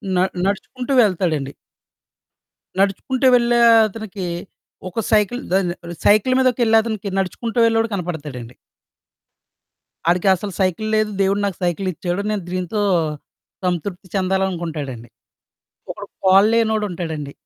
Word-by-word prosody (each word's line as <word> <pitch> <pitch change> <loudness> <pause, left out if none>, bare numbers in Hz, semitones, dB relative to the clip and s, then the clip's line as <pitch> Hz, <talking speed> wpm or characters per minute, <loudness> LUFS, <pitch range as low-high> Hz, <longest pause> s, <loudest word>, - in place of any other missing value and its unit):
న - - +2 0.3
నడుచుకుంటూ 250 +7 -2
వెళ్తాడండి. 165 -8 0 1.3
నడుచుకుంటూ 245 +7 +1
వెళ్ళే 240 0 +3 0.3
అతనికి 210 -3 -7 0.6
ఒక 225 +6 -3
సైకిలు 215 +4 +2
దాని 185 -3 +2 0.3
సైకిలు 215 +5 +4
మీదకెళ్ళే 245 -3 +3
అతనికి, 215 -3 -4
నడుచుకుంటూ 225 +6 -2
వెళ్ళేవాడు 225 0 +2
కనపడతాడండి. 150 -10 -5 1.5
ఆడికి 180 +2 +2
అసలు 200 +2 -6
సైకిలు 190 +3 0
లేదు, 215 0 +1
దేవుడు 195 +1 +2
నాకు 195 -4 -3
సైకిలిచ్చాడు. 180 +1 -2
నేను 200 -4 -2
దీంతో 185 +3 -2 0.8
సంతృప్తి 180 +2 -3
చెందాలనుకుంటాడండి. 170 -10 -2 0.8
ఒకడు - - -7 0.2
కాల్లేనోడుంటాడండి. 195 -7 +2
195 Hz, 95 wpm, -20 LUFS, 175-220 Hz, 1.5 s, సైకిలు